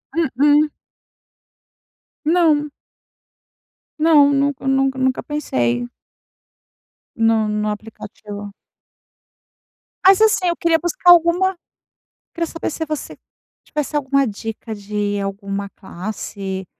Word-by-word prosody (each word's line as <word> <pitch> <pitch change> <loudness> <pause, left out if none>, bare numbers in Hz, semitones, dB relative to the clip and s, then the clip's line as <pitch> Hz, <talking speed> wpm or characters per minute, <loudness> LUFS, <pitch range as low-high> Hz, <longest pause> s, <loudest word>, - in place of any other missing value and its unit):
Mm, 330 -3 +2
mm. 295 +1 +5 1.6
Não. 310 -3 +3 1.3
Não, 300 -3 +5
nunca 275 -1 0
nunca 270 0 +1
nunca 260 0 0
pensei 120 - -1 1.3
no 225 -1 +2
no 210 0 -1
aplicativo. 205 -1 -9 1.5
Mas 390 +2 +7
assim, 420 -4 +3
eu 340 - +1
queria 330 -1 +2
buscar 350 +1 +3
alguma 350 +2 +4 0.8
queria 335 -1 -1
saber 330 0 -4
se 320 - -4
você 305 -1 -5 0.5
tivesse 300 0 -3
alguma 275 -1 +1
dica 220 +1 -6
de 205 0 -3
alguma 200 0 -4
classe, 190 -1 -6
270 Hz, 95 wpm, -20 LUFS, 205-315 Hz, 1.6 s, Mas